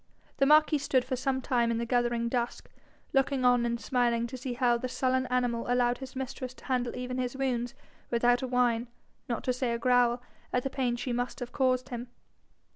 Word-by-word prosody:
The 275 - +3
marquis 305 0 +5
stood 265 -3 +1
for 260 0 -1
some 260 +1 -1
time 240 -3 +2
in 230 - 0
the 235 - -1
gathering 240 -1 +1
dusk, 240 0 -3 0.4
looking 270 -1 +2
on, 245 -1 +4
and 235 0 -2
smiling 235 0 +1
to 245 +2 -6
see 255 0 -4
how 240 0 +3
the 255 +1 -3
sullen 260 0 0
animal 245 -1 0
allowed 245 0 +2
his 265 -1 -9
mistress 260 -1 -5
to - - -16
handle 250 -2 -1
even 250 0 -3
his 250 +1 -2
wounds 250 -2 -1 0.3
without 245 +1 +3
a 260 - -2
whine, 245 -1 +1 0.4
not 235 - -2
to 255 - +1
say 245 -1 -1
a - - 0
growl, 245 0 +3 0.3
at 250 - 0
the 270 - -2
pain 250 -3 0
she 245 +1 -3
must 245 +1 -2
have 245 -1 -6
caused 255 -2 +1
him. 240 0 -5
250 Hz, 205 wpm, -29 LUFS, 240-260 Hz, 0.4 s, marquis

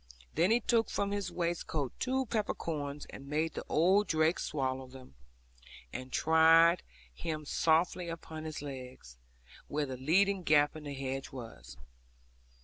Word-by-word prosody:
Then 170 +4 +3
he 230 +2 +4
took 230 -1 +2
from 200 0 -1
his 200 -2 -2
waistcoat 170 -5 -2
two 265 +1 0
peppercorns, 155 - -3
and 135 - -10
made 155 +3 -1
the - - -5
old 190 +6 +4
drake 160 +2 +2
swallow 130 -2 -2
them, 130 - -13 0.8
and 130 0 -6
tried 165 +3 +5 0.3
him 155 - -4
softly 170 +4 +1
upon 160 -1 -7
his 155 -2 -5
legs, 130 - -9 0.5
where 150 0 -1
the 130 -2 -6
leading 190 +8 +2
gap 150 -3 +3
in 155 -1 -9
the 140 -1 -5
hedge 135 0 -4
was. 90 - -10
155 Hz, 145 wpm, -32 LUFS, 135-175 Hz, 0.8 s, tried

